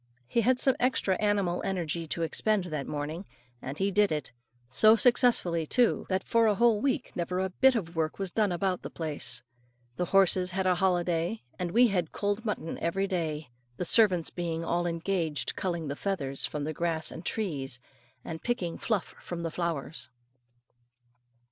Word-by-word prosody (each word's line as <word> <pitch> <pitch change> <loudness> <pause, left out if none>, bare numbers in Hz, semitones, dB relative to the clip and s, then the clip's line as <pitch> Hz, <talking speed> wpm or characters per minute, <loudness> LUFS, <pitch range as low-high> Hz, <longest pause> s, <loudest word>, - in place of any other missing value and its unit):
He 235 - +1
had 250 +3 +3
some 265 -1 +4
extra 245 -6 +2
animal 200 -4 +1
energy 170 -3 -2
to 165 +2 -2
expend 205 +5 +1
that 155 -6 -4
morning, 150 +4 -4 0.4
and 135 +3 -6
he 195 +3 +1
did 205 0 +3
it 150 -3 -2 0.4
so 215 - +6
successfully, 225 -9 +3
too, 245 +5 +2
that 190 0 0
for 230 -1 +3
a 210 - +3
whole 230 -1 +3
week 270 0 -1
never 180 +1 -2
a 190 0 -1
bit 265 +7 +4
of 170 -6 -3
work 160 -1 -1
was 195 -2 -3
done 210 -2 +1
about 180 +1 -1
the - - -6
place. 155 -3 -3 0.5
The 180 - 0
horses 185 0 +3
had 190 - 0
a 185 - +4
holiday, 175 +1 0 0.2
and 180 -1 -1
we 235 +6 +5
had 180 -5 -1
cold 205 +2 -1
mutton 210 -7 -3
every 195 +4 0
day, 160 -7 -3 0.3
the 180 - -1
servants 185 -4 +4
being 165 -2 -3
all 175 +1 0
engaged 165 -2 -1
culling 170 -4 -2
the 140 - -3
feathers 145 -8 -1
from 150 -1 -4
the 155 +2 -3
grass 165 -1 -1
and 165 - -8
trees, 140 - -3 0.5
and 160 -1 -6
picking 190 -9 -2
the - - -20
fluff 210 -7 -1
from 170 -1 -6
the 165 - -2
flowers. 165 -4 -3
180 Hz, 180 wpm, -29 LUFS, 165-205 Hz, 0.5 s, so